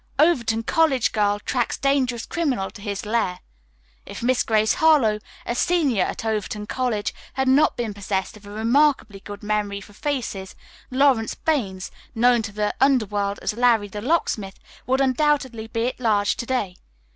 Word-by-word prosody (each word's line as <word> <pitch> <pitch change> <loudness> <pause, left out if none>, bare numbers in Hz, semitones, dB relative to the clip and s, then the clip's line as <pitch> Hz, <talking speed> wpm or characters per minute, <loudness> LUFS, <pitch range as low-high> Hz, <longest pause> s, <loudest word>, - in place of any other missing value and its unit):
"Overton 240 -8 +2
College 275 -2 +2
Girl 205 -1 +1
Tracks 240 +3 -2
Dangerous 260 -4 0
Criminal 255 - -1
to 200 - -13
His 200 0 -4
Lair. 210 -5 0 0.6
If - - -9
Miss 255 +1 +2
Grace 215 -1 +2
Harlowe, 275 -10 +4 0.3
a - - -1
senior 280 - +2
at - - -5
Overton 210 -1 -2
College, 230 -3 -2 0.2
had 265 0 -1
not 270 +4 +4
been 230 -3 -2
possessed 195 0 -3
of 205 -1 -14
a - - -9
remarkably 225 0 +1
good 205 +1 -10
memory 210 -1 -1
for 205 +1 -14
faces, 210 -7 -4 0.3
Lawrence 260 -4 +2
Baines, 200 - -2 0.2
known 240 +1 +4
to 215 -1 -6
the 210 0 -1
underworld 210 -7 +2
as - - 0
'Larry, 230 -3 +2
the 205 +1 -6
Locksmith,' 215 - -1 0.3
would 260 +2 +2
undoubtedly 260 -4 +1
be 230 +2 -1
at - - -10
large 210 -4 +2
to 235 - -5
day. 210 -9 -2
225 Hz, 160 wpm, -23 LUFS, 205-260 Hz, 0.6 s, Harlowe